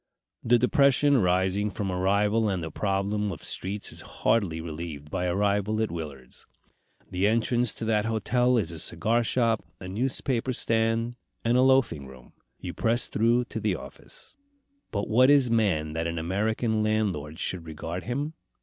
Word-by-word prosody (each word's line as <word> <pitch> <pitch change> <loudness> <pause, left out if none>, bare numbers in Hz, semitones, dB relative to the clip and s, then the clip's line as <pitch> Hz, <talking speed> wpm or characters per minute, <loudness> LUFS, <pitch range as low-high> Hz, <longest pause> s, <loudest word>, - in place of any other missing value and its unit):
The 120 +1 +4
depression 140 +2 +4
arising 95 +1 +1
from 100 -1 -3
arrival 105 +4 +2
and 95 -4 -2
the 80 - -5
problem 100 +2 -1
of 80 - -8
streets 100 +2 -2
is - - -9
hardly 95 -8 0
relieved 80 -2 -7
by 90 - -1
arrival 100 +3 +1
at 110 -4 0
Willard's. 75 -6 -8 0.6
The 90 +2 +1
entrance 115 +1 +2
to - - -5
that 110 -1 +1
hotel 120 +3 +1
is 90 -8 -1
a 80 - -5
cigar 120 +2 +1
shop, 115 -1 +1 0.2
a 95 - -8
newspaper 125 +4 -1
stand, 115 +1 0 0.3
and 115 +1 +3
a 125 - +5
loafing 130 - +3
room. 65 -2 -15 0.2
You - - -6
press 120 +2 +1
through 120 +3 +2
to 115 - -5
the 105 -3 0
office. - - -11 0.5
But 100 -1 -2
what 125 +4 +5
is 140 -4 +5
man 90 -9 +1
that 80 +1 -2
an 85 0 -3
American 110 +6 0
landlord 100 -9 -1
should 90 -2 -3
regard 80 +3 -6
him? 140 +7 -3
105 Hz, 160 wpm, -27 LUFS, 90-115 Hz, 0.6 s, a